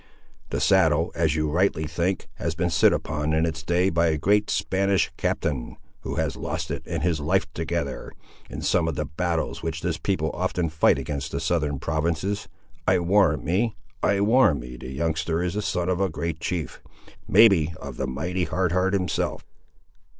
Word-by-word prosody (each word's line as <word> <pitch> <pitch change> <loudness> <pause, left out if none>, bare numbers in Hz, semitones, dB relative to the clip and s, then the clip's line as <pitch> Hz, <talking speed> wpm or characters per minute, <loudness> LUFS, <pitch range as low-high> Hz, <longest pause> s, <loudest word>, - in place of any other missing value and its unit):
The - - -2
saddle, 80 -4 +3
as 80 -2 +1
you 75 0 0
rightly 85 -2 +1
think, 85 +5 -2
has 80 -1 -2
been 90 +1 0
sit 85 - +5
upon 75 +1 -1
in 80 +1 +2
its 80 -1 -3
day 90 +3 +1
by 85 0 +2
a 80 -1 +1
great 105 +7 +2
Spanish 95 -3 +1
captain, 70 -7 -2 0.2
who - - -5
has - - -1
lost - - -4
it - - -3
and - - -3
his 85 -4 +1
life 75 - +1
together, - - -3 0.4
in - - -6
some 85 -2 +2
of 80 - -1
the 75 - -2
battles 80 +2 -2
which 80 -1 -4
this - - -1
people - - -1
often 85 -2 -1
fight 80 0 +3
against 70 -2 -4
the - - -2
southern 75 -5 0
provinces. 85 +8 -1 0.4
I - - +5
warrant 90 -3 +3
me, 105 +7 0 0.3
I 100 0 +2
warrant 110 - +4
me, 60 +1 -8
the 65 - -8
youngster 80 +4 -1
is 90 -1 -1
the 105 - -1
son 90 -3 -1
of 90 0 0
a 95 - +2
great 80 0 -4
chief; 85 -2 -4 0.5
may 110 +4 +8
be 85 -6 +2
of 70 -3 -8
the 65 - -2
mighty 85 +8 -2
Hard 90 +2 0
Heart 95 +2 +1
himself!" 90 -2 -1
85 Hz, 185 wpm, -25 LUFS, 75-90 Hz, 0.5 s, may